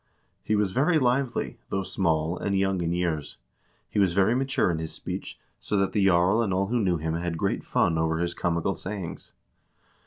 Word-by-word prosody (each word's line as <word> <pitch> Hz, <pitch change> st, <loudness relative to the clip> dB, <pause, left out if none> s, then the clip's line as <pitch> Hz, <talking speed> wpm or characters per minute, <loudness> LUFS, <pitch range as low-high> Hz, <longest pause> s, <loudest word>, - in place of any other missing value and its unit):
"He 110 Hz, -, +1 dB
was 105 Hz, -2 st, +1 dB
very 150 Hz, -, +3 dB
lively, 130 Hz, -1 st, 0 dB
though 95 Hz, 0 st, -1 dB
small, 80 Hz, -3 st, 0 dB
and 100 Hz, +1 st, -1 dB
young 95 Hz, -1 st, +1 dB
in 85 Hz, 0 st, -1 dB
years; 85 Hz, -4 st, -2 dB, 0.5 s
he -, -, -2 dB
was 95 Hz, -3 st, +3 dB
very 100 Hz, +4 st, +4 dB
mature 130 Hz, -7 st, +1 dB
in 80 Hz, -, -2 dB
his 80 Hz, 0 st, -4 dB
speech, -, -, -6 dB, 0.2 s
so 105 Hz, -, -2 dB
that 95 Hz, -1 st, +1 dB
the 100 Hz, +1 st, +1 dB
jarl 95 Hz, +5 st, +4 dB
and 105 Hz, -4 st, 0 dB
all 95 Hz, +1 st, +1 dB
who 120 Hz, +1 st, +1 dB
knew 90 Hz, -5 st, +1 dB
him 80 Hz, +1 st, -2 dB
had 85 Hz, 0 st, -2 dB
great -, -, -1 dB
fun 80 Hz, -2 st, +1 dB
over 80 Hz, 0 st, +1 dB
his 85 Hz, 0 st, -1 dB
comical 85 Hz, +2 st, 0 dB
sayings. 95 Hz, -4 st, -6 dB
95 Hz, 195 wpm, -26 LUFS, 85-105 Hz, 0.5 s, very